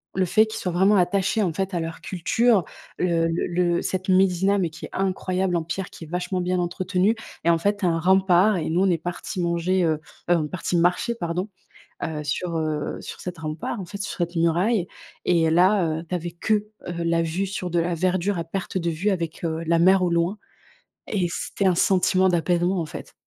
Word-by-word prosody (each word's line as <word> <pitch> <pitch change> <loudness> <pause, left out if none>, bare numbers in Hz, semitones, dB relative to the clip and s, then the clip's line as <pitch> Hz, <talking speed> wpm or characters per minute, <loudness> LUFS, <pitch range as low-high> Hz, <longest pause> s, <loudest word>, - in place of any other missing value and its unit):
le 190 0 +2
fait 215 +5 +4
qu'ils 220 - -6
soient 180 - -2
vraiment 190 +4 +4
attachés 195 +3 +2
en 175 -4 0
fait 190 +2 -2
à - - +1
leur 165 0 -5
culture, 205 +3 +2 0.3
le 170 -2 +1
le-le 175 +1 0
cette 185 0 -3
médina, 190 +1 +3
mais 175 -5 0
qui 170 - -9
est - - -23
incroyable 185 -1 -1
en 170 - +1
pierre, 180 +3 -4
qui 165 - -10
est - - -14
vachement 180 +2 -2
bien 180 +1 0
entretenue 185 +3 0 0.3
et 170 - +4
en 165 - +2
fait 205 +4 +1
tu 205 - -2
as - - +4
un 165 0 0
rempart 190 +2 +4
et 160 - -2
nous 175 +3 +2
on 195 - +3
est 175 - +2
partis 175 +2 -5
manger, 175 +2 +1
heu 160 -2 +3 0.4
heu, - - +6
on 160 -3 0
est - - -4
partis 180 0 -2
marcher, 180 +8 +2
pardon, 180 -3 -3 0.6
heu, 155 -1 -3
sur 170 +4 -2
heu, 155 -2 -2
sur - - -8
cette 180 -2 -6
rempart, 155 +7 -4
en - - -6
fait, 200 - -8
sur - - -5
cette 175 0 -2
muraille 170 +5 +2 0.4
et 165 -2 +3
là, 180 +3 +4 0.2
heu, - - -13
tu 180 - -7
avais 175 -1 -2
que, 195 +6 -1 0.3
heu, 170 -1 -3
la 170 0 +2
vue 170 +4 -2
sur 185 -2 -4
de 170 - +2
la 170 +1 0
verdure 185 +2 0
à 170 - -2
perte 185 +3 -4
de 170 -2 -1
vue 175 +6 -1
avec, 170 -4 -3
heu, 165 0 -2
la 165 +1 +2
mer 185 +2 +5
au 175 - +1
loin 170 +5 +1 0.7
et 190 -4 +1
c'était 195 +3 -3
un 185 - +5
sentiment 185 +1 +3
d'apaisement, 175 +1 +1
en 160 - -3
fait. - - -9
180 Hz, 225 wpm, -24 LUFS, 170-190 Hz, 0.7 s, heu